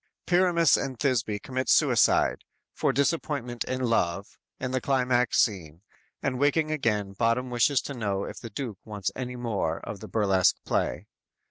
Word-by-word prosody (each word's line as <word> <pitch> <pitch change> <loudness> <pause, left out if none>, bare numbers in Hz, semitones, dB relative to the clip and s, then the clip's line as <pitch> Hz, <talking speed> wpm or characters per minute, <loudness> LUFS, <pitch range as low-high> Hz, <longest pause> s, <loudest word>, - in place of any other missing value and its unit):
"_ - - -57
Pyramus 175 -3 +4
and 130 -2 -4
Thisby 120 -6 0
commit 130 0 -3
suicide, - - +3 0.3
for - - +1
disappointment 140 -5 -1
in 130 0 -3
love, 100 -4 -1 0.2
in 130 -1 -3
the 130 0 -1
climax 125 -3 +1
scene, 85 -5 0 0.4
and 130 -2 -1
waking 155 +2 +2
again 105 -9 -1
Bottom 115 +4 0
wishes 125 +3 +2
to 140 - -5
know 100 -5 -2
if - - -7
the 115 - -8
Duke 115 -4 -6
wants 105 -3 -4
any 125 -1 -5
more 105 -9 -2
of 105 - -7
the - - -9
burlesque 95 -4 +2
play. - - -1
120 Hz, 160 wpm, -27 LUFS, 105-135 Hz, 0.4 s, Pyramus